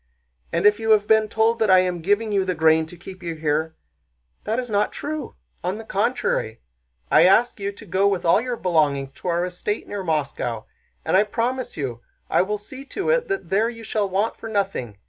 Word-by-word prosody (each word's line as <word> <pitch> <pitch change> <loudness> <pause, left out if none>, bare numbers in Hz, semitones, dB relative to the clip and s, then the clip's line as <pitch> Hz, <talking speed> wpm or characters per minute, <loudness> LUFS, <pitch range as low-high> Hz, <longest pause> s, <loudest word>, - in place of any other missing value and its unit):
And - - 0
if 210 +1 +5
you 225 0 -2
have 210 -1 +3
been 220 0 +3
told 225 +1 +2
that 220 - +2
I 185 - +7
am 180 -2 -2
giving 205 +5 +1
you 200 -2 +2
the 185 -1 -2
grain 160 0 +3
to 175 - -11
keep 185 +2 -11
you 170 -2 -4
here—that 150 - -5
is 250 -1 -2
not 205 0 +1
true. 305 0 -5 0.3
On 180 +3 -2
the 225 - -7
contrary, 205 - -1 0.5
I 155 +3 +7
ask 225 +5 +4
you 200 0 -2
to 215 - -13
go 190 +1 +2
with 195 -3 0
all 170 +5 +5
your 245 -1 -3
belongings 145 -7 +1
to 140 - -9
our 175 0 +1
estate 180 +4 -4
near 205 -1 -4
Moscow, 140 -8 -2 0.4
and - - +1
I 190 - +7
promise 240 +4 -2
you 125 -5 -4 0.3
I - - +4
will 210 +3 -1
see 260 +6 -10
to 390 +10 -2
it - - +1
that 390 -1 -4
there 215 +4 +3
you 230 -1 -9
shall 210 -2 -1
want 200 +4 0
for 225 - -7
nothing. 195 - -2
195 Hz, 210 wpm, -23 LUFS, 160-220 Hz, 0.5 s, I